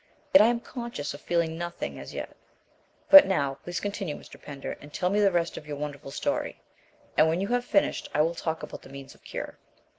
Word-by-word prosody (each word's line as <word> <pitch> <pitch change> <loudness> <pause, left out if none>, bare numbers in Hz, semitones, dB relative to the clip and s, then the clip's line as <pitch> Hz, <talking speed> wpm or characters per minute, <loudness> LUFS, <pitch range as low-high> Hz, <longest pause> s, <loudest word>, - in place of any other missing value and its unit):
Yet 285 - +10
I 215 - +7
am 235 0 +1
conscious 235 - -5
of 145 - -10
feeling 170 -1 0
nothing 175 0 -5
as - - -8
yet. - - -6 0.8
But 290 0 +12
now, 140 -7 0
please 175 0 -3
continue, 200 -6 -3
Mr. - - -14
Pender, 140 -1 -6
and 145 - -12
tell 180 +4 0
me 205 - +2
the 200 -2 +4
rest 170 -1 0
of 150 - -9
your 145 -1 -5
wonderful 145 -1 -6
story; - - -2 0.6
and 155 +1 +5
when 165 +2 0
you 200 +2 -2
have 245 0 +1
finished, 295 - +1
I 150 - +2
will 165 +2 +2
talk 160 -1 -3
about - - -7
the - - -14
means 135 0 -10
of - - -24
cure." - - -6
170 Hz, 220 wpm, -27 LUFS, 145-200 Hz, 0.8 s, But